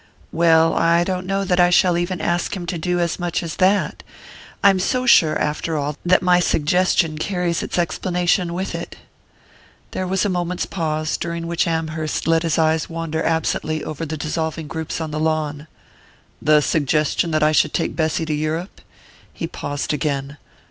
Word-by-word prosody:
"Well, 165 -1 +4
I 170 +1 +3
don't 185 0 -3
know 195 0 0
that 180 -1 +1
I 175 0 +6
shall 180 0 +4
even 175 +1 -2
ask 175 +2 -1
him 175 - -6
to 175 0 -3
do 180 +2 -1
as 170 0 -1
much 175 0 -2
as 165 -2 -5
that 195 +2 +2 0.6
I'm 195 -2 +5
so 255 +7 0
sure, 160 -10 +5
after 155 +2 -2
all, 145 0 -2
that 185 +1 +3
my 180 -1 +4
suggestion 165 -1 +1
carries 180 -2 -1
its - - -4
explanation 175 0 0
with 190 +2 -3
it." - - -6 1.0
There 185 - -3
was 190 +2 0
a - - +3
moment's 180 -1 -2
pause, 155 -3 -2
during 170 -1 -4
which 170 0 0
Amherst 160 -1 -2
let 165 0 +3
his 165 -3 0
eyes 160 -1 +1
wander 165 -1 -3
absently 155 -1 -1
over 155 +1 -5
the 155 0 -4
dissolving 160 +1 -3
groups 160 +1 -4
on 160 -2 -4
the 155 - -3
lawn. 155 -1 -1 0.7
"The 150 0 +4
suggestion 150 +2 +1
that 155 -1 +1
I 155 - +4
should 155 -1 +3
take - - -2
Bessy 160 0 0
to 155 - -2
Europe?" 155 +5 -3 0.5
He - - -5
paused 145 +1 -4
again. 140 -1 -2
165 Hz, 175 wpm, -21 LUFS, 155-180 Hz, 1.0 s, I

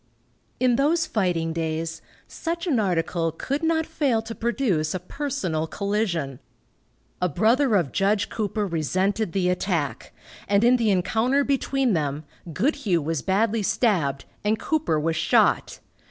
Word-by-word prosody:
In 250 -2 +3
those 320 +4 +2
fighting 175 -6 0
days, 165 0 -3 0.3
such 335 +1 -4
an 285 -10 +1
article 170 -3 0
could 270 - -3
not 320 -1 +1
fail 250 -9 0
to 225 +1 -6
produce 225 - 0
a - - -2
personal 185 - -3
collision. 185 - -2 0.8
A 180 - +2
brother 225 - +3
of 170 -9 +1
Judge 200 +1 +1
Cooper 210 -1 -2
resented 185 +4 0
the 185 0 0
attack, 180 -5 -1 0.4
and 200 +2 +3
in 245 +2 +5
the 230 -3 +1
encounter 225 +8 +2
between 270 -3 +1
them, 150 -2 -1 0.3
Goodhue 215 - +1
was 160 -1 -2
badly 215 +3 +1
stabbed 175 - +1 0.2
and 210 +1 +1
Cooper 300 - 0
was 160 +1 -1
shot. - - +2
200 Hz, 140 wpm, -24 LUFS, 165-245 Hz, 0.8 s, in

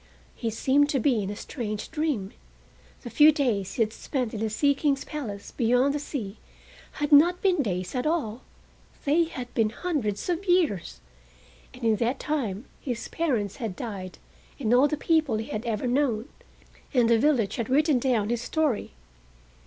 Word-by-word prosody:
He 230 - -2
seemed 275 +6 +2
to 275 - +1
be 240 -3 +2
in 195 - -3
a 205 - -4
strange 215 -2 -5
dream. 300 -11 -1 0.7
The 240 - -7
few 300 +1 +7
days 235 - -1
he 230 - +3
had 215 0 -4
spent 250 -4 -3
in 220 - -4
the 220 0 -1
Sea 280 +7 +2
King's 280 0 0
palace 215 -10 -6
beyond 250 +3 +2
the 295 - -1
sea 230 -8 -5 0.6
had 295 0 -3
not 340 +5 +6
been 365 -5 +3
days 185 -6 -3
at 255 +2 -1
all: 265 -8 -1 0.6
they 315 +4 +3
had 250 -6 -7
been 220 -2 +2
hundreds 240 - -2
of 355 +2 -1
years, 260 - +1 0.7
and 250 - -13
in 220 -2 +3
that 240 +4 0
time 250 -8 -2
his 245 -4 -4
parents 235 - -1
had 220 -6 -4
died 195 -6 -6 0.4
and 240 -4 +1
all 255 +4 +6
the 300 - -2
people 310 -8 +2
he 220 - -5
had 215 +3 -4
ever 220 +1 -1
known, 250 -2 +1 0.7
and 245 -2 +5
the 230 -1 +4
village 235 -8 +2
had 230 -1 -3
written 290 0 +3
down 235 -5 +1
his 240 -1 -1
story. 280 - -1
250 Hz, 175 wpm, -26 LUFS, 215-295 Hz, 0.7 s, few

